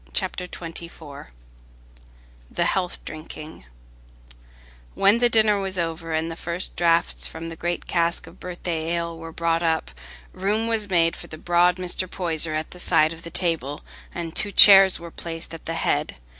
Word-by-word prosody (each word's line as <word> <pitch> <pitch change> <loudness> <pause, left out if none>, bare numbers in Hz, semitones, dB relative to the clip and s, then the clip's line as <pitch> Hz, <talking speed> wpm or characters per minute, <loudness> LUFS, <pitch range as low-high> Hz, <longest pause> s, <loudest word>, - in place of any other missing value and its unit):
Chapter 185 -2 -2
XXIV 165 - -9 1.2
The - - -1
Health 180 -2 -1
Drinking 155 - -10 1.3
When 205 +4 +4
the 240 0 +3
dinner 215 -3 +3
was 190 -1 -3
over, 165 -1 -3
and 160 +1 -1
the - - -6
first 170 +2 -4
draughts 170 -1 +1
from 165 +1 -8
the 165 - -7
great 175 +1 -3
cask 170 -1 -1
of 165 +3 -16
birthday 175 -2 -4
ale 170 0 -3
were 165 0 -9
brought 165 0 0
up, 160 - -1 0.4
room 210 +4 -1
was 220 -3 0
made 165 -3 +2
for - - -9
the 155 - -9
broad 175 +2 +2
Mr. 185 0 0
Poyser 165 -4 +1
at 155 0 -4
the 180 - -11
side 165 -3 +3
of 165 - -11
the 170 - -9
table, 160 -5 -2 0.3
and 170 -1 -6
two 205 - +3
chairs 195 -2 +9
were 170 0 -10
placed 165 0 -6
at 165 - -10
the 165 - -3
head. 150 -2 -1
170 Hz, 170 wpm, -23 LUFS, 165-180 Hz, 1.3 s, chairs